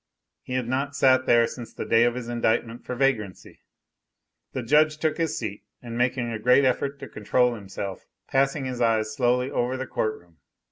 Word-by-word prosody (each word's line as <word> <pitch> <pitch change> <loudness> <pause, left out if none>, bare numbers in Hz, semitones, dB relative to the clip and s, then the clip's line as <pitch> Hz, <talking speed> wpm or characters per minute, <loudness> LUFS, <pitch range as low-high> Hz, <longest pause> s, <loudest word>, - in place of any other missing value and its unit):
He 125 - -7
had 125 -2 -1
not 140 +3 -2
sat 130 -1 +4
there 120 -1 +5
since 120 -1 -8
the - - -6
day 115 +1 +4
of 120 0 +1
his 125 -2 -5
indictment 115 0 -1
for 125 - -5
vagrancy. 115 -8 -1 0.9
The 130 - -4
judge 150 +5 +3
took 155 +1 -1
his 165 -2 0
seat, 105 -3 -5 0.2
and 120 -1 -8
making 125 0 0
a 110 - -4
great 125 +5 +4
effort 140 +2 0
to 135 - -6
control 120 +3 +1
himself, 100 -2 -7 0.2
passed 135 +2 +1
his 130 -3 -4
eyes 110 -2 +1
slowly 125 +2 +1
over 125 +2 -1
the 130 - -4
court 110 -3 -2
room. 85 -2 -25
125 Hz, 190 wpm, -25 LUFS, 115-130 Hz, 0.9 s, there